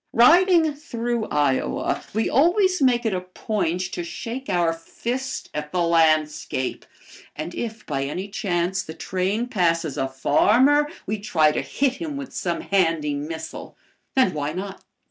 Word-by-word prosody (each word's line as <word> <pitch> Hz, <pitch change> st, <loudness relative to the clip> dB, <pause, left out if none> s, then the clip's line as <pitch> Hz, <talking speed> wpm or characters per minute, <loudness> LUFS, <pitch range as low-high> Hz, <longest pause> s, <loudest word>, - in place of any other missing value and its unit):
Riding 330 Hz, +5 st, +5 dB
through 240 Hz, -6 st, -3 dB
Iowa, 145 Hz, -3 st, 0 dB
we 220 Hz, +2 st, 0 dB
always 365 Hz, -, +3 dB
make 245 Hz, -3 st, +3 dB
it 220 Hz, -, +1 dB
a 180 Hz, -, -1 dB
point 185 Hz, -1 st, -2 dB
to 175 Hz, -, -3 dB
shake 235 Hz, +9 st, -6 dB
our 175 Hz, -3 st, +2 dB
fist 245 Hz, +10 st, -5 dB
at 150 Hz, 0 st, -4 dB
the 180 Hz, -, 0 dB
landscape. 155 Hz, -5 st, +1 dB, 0.5 s
And 155 Hz, +3 st, -5 dB
if 225 Hz, -1 st, -5 dB
by 135 Hz, -2 st, -2 dB
any 180 Hz, +8 st, -4 dB
chance 190 Hz, -3 st, -1 dB
the 160 Hz, -, -9 dB
train 190 Hz, +7 st, -1 dB
passes 170 Hz, -, 0 dB
a 135 Hz, -, 0 dB
farmer 245 Hz, -, +3 dB, 0.2 s
we 215 Hz, +1 st, -2 dB
try 160 Hz, -7 st, +3 dB
to -, -, -1 dB
hit 265 Hz, -1 st, 0 dB
him 300 Hz, -3 st, -5 dB
with 275 Hz, -2 st, -7 dB
some 170 Hz, -2 st, -2 dB
handy 165 Hz, -6 st, +1 dB
missile. 160 Hz, +3 st, -6 dB, 0.4 s
And 260 Hz, -8 st, +4 dB
why 150 Hz, 0 st, -2 dB
not? 195 Hz, +2 st, -6 dB
190 Hz, 150 wpm, -23 LUFS, 160-245 Hz, 0.5 s, Riding